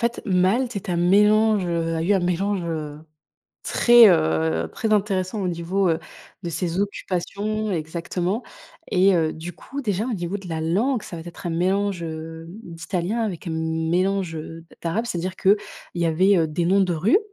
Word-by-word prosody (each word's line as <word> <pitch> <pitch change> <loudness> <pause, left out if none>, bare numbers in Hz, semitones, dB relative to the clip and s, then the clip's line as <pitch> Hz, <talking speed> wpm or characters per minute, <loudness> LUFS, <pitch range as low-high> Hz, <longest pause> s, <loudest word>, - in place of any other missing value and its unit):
fait, 240 - -4
Malte 210 +6 +2
est 195 - -5
un 175 - 0
mélange, 210 +3 +4
heu, 165 -1 -1
a 160 - -1
eu 190 +5 +2
un 195 - +4
mélange, 180 +2 0
heu, 155 -3 -4 0.6
très, 240 -2 +7
heu, 80 - +2
très 220 -1 -1
intéressant 195 -1 0
au 185 - -1
niveau, 175 +3 0
heu, 165 -1 +1 0.4
de 170 - -4
ses 175 +2 -2
occupations, 205 +2 -2
exactement 175 +6 -2 0.5
et 190 +1 +5
heu, 160 -2 +1
du 165 +3 -7
coup, 275 - -7
déjà, 210 -3 -1
au 250 - -2
niveau 180 0 -3
de 190 -3 -10
la 160 -1 -3
langue, 215 +10 +1
ça 170 - -8
va 165 - -7
être 175 0 -9
un - - -1
mélange, 190 +2 0
heu, 160 0 -6 0.2
d'italien 175 +5 -3
avec 190 -7 -4
un - - -2
mélange, 165 +3 0
heu, 165 +1 -8 0.2
d'arabe. 205 +8 -1
C'est-à-dire 185 -2 -3
qu'il 200 +2 +4 0.4
y 170 -1 0
avait 175 +1 +3
des 170 +3 -1
noms 195 +2 +4
de 185 -2 +2
rue, 190 - +3
180 Hz, 180 wpm, -23 LUFS, 165-200 Hz, 0.6 s, très